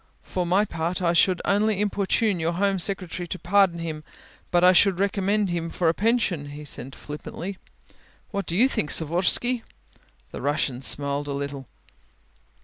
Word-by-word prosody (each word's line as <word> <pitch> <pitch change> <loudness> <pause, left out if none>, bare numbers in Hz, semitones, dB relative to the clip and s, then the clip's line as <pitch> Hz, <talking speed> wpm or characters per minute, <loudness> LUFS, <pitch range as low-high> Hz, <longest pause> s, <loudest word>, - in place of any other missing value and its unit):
"For 180 -2 -3
my 195 +4 +3
part 170 -1 -3
I 175 -2 +1
should 180 +1 +3
not - - +2
only 210 0 +1
importune 205 -1 0
your 165 +1 0
Home 195 +2 +1
Secretary 180 -2 -1
to 185 - -5
pardon 185 0 +2
him, 160 -2 -5 0.5
but 175 0 +2
I 180 - +8
should 185 0 +4
recommend 200 0 0
him 165 -1 -2
for 165 0 +1
a - - +2
pension," 200 -8 0
he 145 +1 -9
said 135 -1 -4
flippantly. 170 +5 -7 0.7
"What 200 -2 -3
do 170 - -2
you 245 +5 +5
think, 155 - -1
Savorsky?" 185 - +2 0.7
The - - -7
Russian 140 -2 -1
smiled 140 +1 +1
a 140 - -3
little. 140 -2 -5
175 Hz, 165 wpm, -24 LUFS, 160-200 Hz, 0.7 s, I